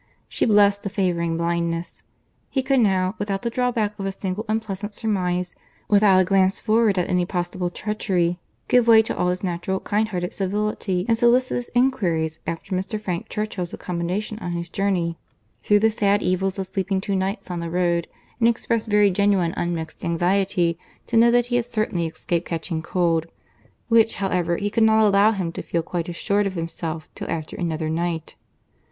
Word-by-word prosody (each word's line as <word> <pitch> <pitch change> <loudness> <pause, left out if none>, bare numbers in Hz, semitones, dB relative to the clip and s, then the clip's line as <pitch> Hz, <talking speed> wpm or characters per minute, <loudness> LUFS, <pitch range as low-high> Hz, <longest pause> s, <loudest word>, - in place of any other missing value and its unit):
She - - 0
blessed 205 -2 +4
the 200 - -4
favouring 170 -4 0
blindness. 170 0 -2 0.5
He 265 - -1
could 270 0 +2
now, 190 -4 +2
without 200 -1 -2
the 235 - -1
drawback 230 -4 -1
of 195 - -3
a - - -1
single 190 +2 -4
unpleasant 210 -2 -3
surmise, 180 -5 -1 0.3
without 200 -2 +5
a - - +2
glance 190 0 +2
forward 220 -2 +2
at 180 - +1
any 180 -1 +1
possible 175 0 -2
treachery 205 -1 -2
in - - +3
his - - -2 0.3
guest, - - -44
give 245 -2 +4
way 225 -1 +7
to - - -4
all 180 - 0
his 180 +1 -1
natural 185 +1 -2
kind 215 +1 0
hearted 180 -4 -3
civility 195 -1 -1
in 230 - +3
solicitous 240 +1 +2
inquiries 175 -12 +1
after 185 +3 -3
Mr. 190 +3 -3
Frank 180 -5 -4
Churchill's 205 -5 -3
accommodation 180 +5 -3
on 175 -5 -4
his 170 0 -5
journey, 180 -4 -1 0.4
through 205 - +4
the 220 +2 +3
sad 205 -1 +1
evils 185 +2 0
of 190 - -2
sleeping 190 +1 -1
two 200 0 -2
nights 195 0 -2
on 175 - -3
the 170 0 -4
road, 175 -1 0 0.3
and 230 - +4
express 230 -1 -1
very 205 -1 +4
genuine 190 -3 +2
unmixed 165 -2 -4
anxiety 175 0 +1 0.3
to 235 - -4
know 230 +1 +6
that 240 0 +3
he 245 0 0
had 240 - 0
certainly 215 -8 -1
escaped 170 +2 -3
catching 165 0 -3
cold—which, 175 +7 -1
however, 180 -3 0
he 205 0 -2
could 225 - +1
not 220 0 +5
allow 200 +1 +5
him 190 -6 -2
to - - -5
feel 170 -1 -2
quite 170 0 -3
assured 200 +4 0
of 195 - -4
himself 165 -1 -4
till - - -7
after 155 -2 -4
another 160 -2 -2
night. 165 0 -2
190 Hz, 185 wpm, -23 LUFS, 175-210 Hz, 0.5 s, way